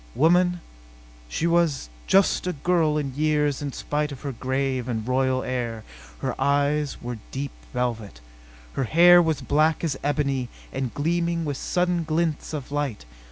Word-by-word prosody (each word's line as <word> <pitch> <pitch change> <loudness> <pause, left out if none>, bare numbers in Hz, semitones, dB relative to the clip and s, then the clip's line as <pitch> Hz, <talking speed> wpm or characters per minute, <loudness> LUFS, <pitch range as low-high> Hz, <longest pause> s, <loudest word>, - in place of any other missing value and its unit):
Woman? 175 +3 +3 0.7
She 160 - -2
was 170 - +2 0.2
just 195 -1 +3
a 180 - 0
girl 155 0 +1
in 140 -3 -2
years 150 -1 +1
in 145 -1 -3
spite 150 +2 -2
of 135 - -8
her 140 - -3
grave 130 0 -2
and 115 -2 -3
royal 130 0 +1
air. 120 -3 -3 0.4
Her - - -1
eyes 145 +1 +1
were 120 -1 -5
deep 140 +1 -4 0.2
violet. 115 - -3 0.5
Her 135 - -1
hair 175 +6 +7
was 160 -4 0
black 155 +5 +2
as 145 -5 -1
ebony 140 -3 0 0.2
and 130 -2 -2
gleaming 170 +3 0
with 145 -2 -2
sudden 180 -1 0
glints 160 -1 -1
of 145 -3 -6
light. 145 - -2
145 Hz, 155 wpm, -25 LUFS, 130-160 Hz, 0.7 s, hair